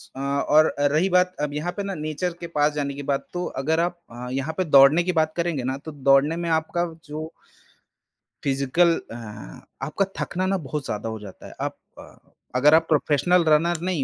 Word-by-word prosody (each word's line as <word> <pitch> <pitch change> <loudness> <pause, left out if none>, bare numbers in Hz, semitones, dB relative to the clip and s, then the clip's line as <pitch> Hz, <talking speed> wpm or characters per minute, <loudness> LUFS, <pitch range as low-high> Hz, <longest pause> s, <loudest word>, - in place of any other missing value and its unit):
अ, - - -7
और 140 +3 +3
रही 150 +6 +2
बात 180 0 +2
अब 150 -1 -2
यहाँ 155 +4 -2
पे 200 - -2
ना 195 0 -3
नेचर 155 +3 -3
के 170 - -6
पास 150 -2 +1
जाने 145 -1 -2
के 140 +1 -7
बाद 140 0 -1
तो 175 0 -2 0.2
अगर 160 +3 +1
आप 175 +1 -1
अ, 120 +1 -7
यहाँ 135 +4 -2
पे 185 - +2
दौड़ने 145 +2 +6
की 180 - 0
बात 155 0 -1
करेंगे 170 -6 -1
ना 130 +2 -2
तो 160 - -6
दौड़ने 140 +2 +3
में 170 0 -3
आपका 160 +2 0 0.2
जो 155 +1 -6 1.1
फिजिकल 140 +5 +2 0.2
हाँ 110 -3 -10 0.2
आपका 195 - 0
थकना 185 +1 -2
ना 195 +1 +1
बहुत 150 0 -4
ज़्यादा 105 +2 -3
हो 110 0 -5
जाता 100 -2 -11
है। - - -11
आप - - -2 0.8
अगर 145 +4 +5
आप 165 0 +3
प्रोफेशनल 160 +3 +3
रनर 160 +2 +3
नहीं 175 -5 -1
155 Hz, 195 wpm, -24 LUFS, 140-170 Hz, 1.1 s, दौड़ने